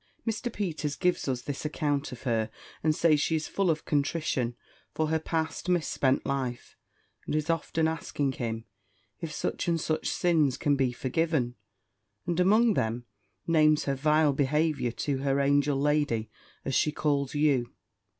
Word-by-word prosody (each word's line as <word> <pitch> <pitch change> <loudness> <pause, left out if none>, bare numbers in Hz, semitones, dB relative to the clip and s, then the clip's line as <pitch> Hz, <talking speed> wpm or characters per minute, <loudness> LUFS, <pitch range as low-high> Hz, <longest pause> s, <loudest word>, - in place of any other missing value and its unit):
"Mr. 225 +2 -2
Peters 160 -8 -3
gives 180 -4 0
us 125 -2 -1
this 140 -1 -5
account 150 -2 -1
of 125 - -9
her, 115 -4 0 0.3
and 155 -1 +3
says 155 -3 +3
she 160 - +1
is 155 - -2
full 195 -2 0
of 155 -2 0
contrition 140 -5 0 0.4
for 155 -1 0
her 160 0 +1
past 160 +2 -2
mis 175 -3 +2
spent 135 -1 +1
life, 130 -3 -3 0.5
and - - -1
is 155 +2 +1
often 165 0 0
asking 150 -3 -1
him, 115 -3 -4 0.5
if 165 - -5
such 150 - -3
and 170 -1 +2
such 155 0 -1
sins 155 -7 +2
can 145 -1 +2
be 135 -2 +1
forgiven? 130 0 0 0.7
and 175 -1 -1
among 215 +5 +5
them, 115 - -1 0.4
names 155 -2 +4
her 140 - 0
vile 150 +1 +3
behaviour 150 -1 +1
to 135 +3 -2
her 135 0 +1
angel 140 0 +2
lady, 145 -7 +1 0.3
as 135 - -2
she 150 - +3
calls 145 -2 0
you. 140 -5 +2
150 Hz, 160 wpm, -28 LUFS, 135-160 Hz, 0.7 s, among